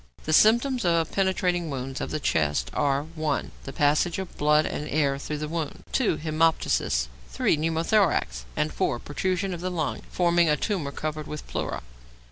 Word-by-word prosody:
The 155 - -1
symptoms 235 - +4
of 170 -2 +2
penetrating 180 -3 +1
wounds 135 -1 -4
of - - -3
the 155 - -2
chest 75 - 0
are 140 -1 +1
(1) 155 -2 -2
The 135 - -5
passage 150 +5 +2
of 190 -2 -6
blood 150 +1 +3
and 150 - -4
air 140 -2 +1
through 150 +1 -4
the 150 +1 -3
wound; 160 -1 -4
(2) 225 - +2
hæmoptysis; 155 - +1 0.2
(3) - - +2
pneumothorax; 160 - +1
and 150 - 0
(4) 130 - 0
protrusion 185 +8 -2
of 170 - -6
the 185 - -2
lung 165 -5 -2
forming 175 -2 +3
a 150 - +3
tumour 170 -6 -2
covered 155 +1 -4
with 150 - -6
pleura. - - -4
155 Hz, 170 wpm, -26 LUFS, 145-175 Hz, 0.2 s, symptoms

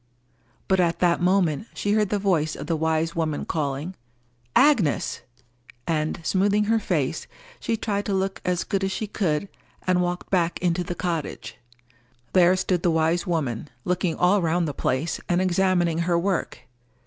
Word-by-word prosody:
But 190 -1 +2
at 170 -2 +2
that 175 -1 +2
moment, 180 0 +2
she 205 - -1
heard 210 -1 +2
the 205 - +1
voice 170 -6 +1
of - - -6
the 165 +1 0
wise 160 +1 0
woman 160 -3 -1
calling, 150 +2 -2 0.6
"Agnes!" 250 - +3 0.6
and, 155 -2 -1
smoothing 200 +4 +2
her 225 +2 +2
face, 160 -10 -1 0.3
she 225 - -1
tried 205 -2 -2
to 200 - 0
look 190 0 -2
as 180 -1 0
good 195 -2 -2
as 195 - 0
she 215 - -2
could, 195 -4 -1 0.4
and 185 -1 +2
walked 175 0 -3
back 175 -3 +1
into 175 0 0
the 175 0 -5
cottage. 170 -5 -4 0.8
There 180 0 +5
stood 180 -1 0
the 175 - +2
wise 160 +3 +1
woman, 150 -6 -2 0.2
looking 180 -2 0
all 185 +3 +3
round 170 0 +1
the 145 - -3
place, 135 +5 -1
and 175 0 +2
examining 180 -2 +2
her 170 0 +1
work. 185 +1 -1
175 Hz, 165 wpm, -24 LUFS, 160-190 Hz, 0.8 s, There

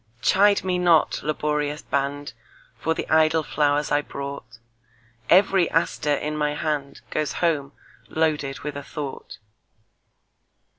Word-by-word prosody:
Chide 200 +1 +4
me 180 -1 0
not, 170 -3 +3
laborious 150 0 -2
band, 140 0 -2 0.5
For 160 - 0
the - - -4
idle 160 0 +3
flowers 145 0 0
I 145 - +3
brought; 140 -5 -8 0.7
Every 190 -1 +5
aster 150 -3 +1
in 150 +2 -3
my 150 -1 0
handGoes 150 0 -3
home 150 -5 0 0.4
loaded 150 -4 -1
with 150 -1 -5
a 145 - -5
thought. 140 -5 -7
150 Hz, 115 wpm, -24 LUFS, 145-160 Hz, 0.7 s, Every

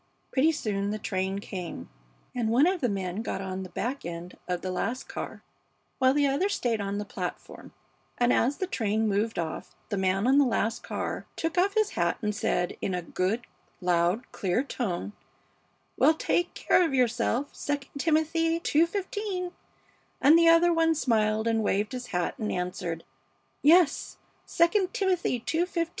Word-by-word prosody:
Pretty 290 +4 +4
soon 205 -9 -2
the 210 - -2
train 190 -2 -2
came, 180 - -6 0.5
and 235 -3 -1
one 250 +6 +5
of 365 0 +1
the 245 - +2
men 190 0 -2
got 225 - -3
on 190 -1 -4
the 185 - -7
back 260 +8 -3
end 170 +1 -7
of 180 -1 -2
the 185 - -3
last 235 +7 -2
car, - - -6 0.6
while 260 -1 +5
the 290 +1 +2
other 280 +9 +1
stayed 235 - 0
on 200 0 -2
the 205 - -3
platform, - - -6 0.5
and 245 0 +3
as 265 +5 +2
the 375 - -1
train 220 - 0
moved 210 +2 0
off 160 -4 -4
the 200 - -1
man 190 +2 +1
on 270 +3 +5
the - - +6
last 230 -3 0
car - - -4
took 325 0 -2
off 385 +3 +2
his 430 -1 +2
hat - - 0
and 210 -1 0
said, 180 -4 0
in 190 - -1
a 180 - -3
good, 185 +7 -1 0.4
loud, 180 +5 +1
clear 190 +6 0
tone, 205 -8 -3 0.9
'Well, 315 - +5
take 350 +2 0
care - - +3
of 320 -6 0
yourself, 245 +2 +1 0.2
II 290 -1 +1 0.2
Timothy 325 +1 +2
ii:15,' 365 +3 0 0.7
and 295 +4 +6
the 335 0 +6
other 335 +1 +6
one 325 0 +3
smiled 220 -5 +1
and 225 -1 +2
waved 210 0 0
his 250 -1 -5
hat 180 -6 -1
and 215 - -2
answered, 180 -2 -3 0.6
'Yes, 320 0 +4 0.4
II 365 +3 +4
Timothy 370 -8 +1
ii:15.' 335 0 0
235 Hz, 170 wpm, -28 LUFS, 195-325 Hz, 0.9 s, the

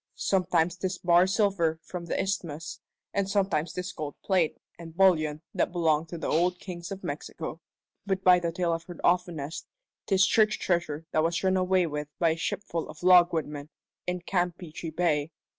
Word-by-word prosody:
Sometimes 180 -2 +1
'tis 185 0 -2
bar 175 +1 +4
silver 190 -5 +1
from 180 -2 -6
the - - -2
isthmus, 170 -5 -3 0.3
and 200 -1 0
sometimes 190 -6 0
'tis 180 0 -4
gold 150 -2 -5
plate 185 -5 +1 0.2
and 165 -1 -10
bullion 155 -5 +3
that - - 0
belonged 160 -2 +1
to 170 - -6
the 165 - -5
old 180 +3 +2
Kings 175 -3 -7
of 195 0 -6
Mexico; - - -5 0.5
but 190 -1 -1
by 180 -1 +7
the 170 -1 -2
tale 175 0 0
I've 165 0 -4
heard 175 - -10
offtenest, 170 -4 0 0.4
'tis 195 -1 +4
church 215 -1 +3
treasure 170 -3 -1
that 155 - +2
was 170 +2 0
run 190 0 +3
away 185 -1 +2
with 150 -2 -4
by 170 - +3
a - - 0
shipful 170 0 -3
of 155 - -11
logwoodmen 165 -5 +4 0.4
in 180 0 -2
Campeachy 175 -2 -3
Bay. 160 -2 0
175 Hz, 175 wpm, -28 LUFS, 160-185 Hz, 0.5 s, by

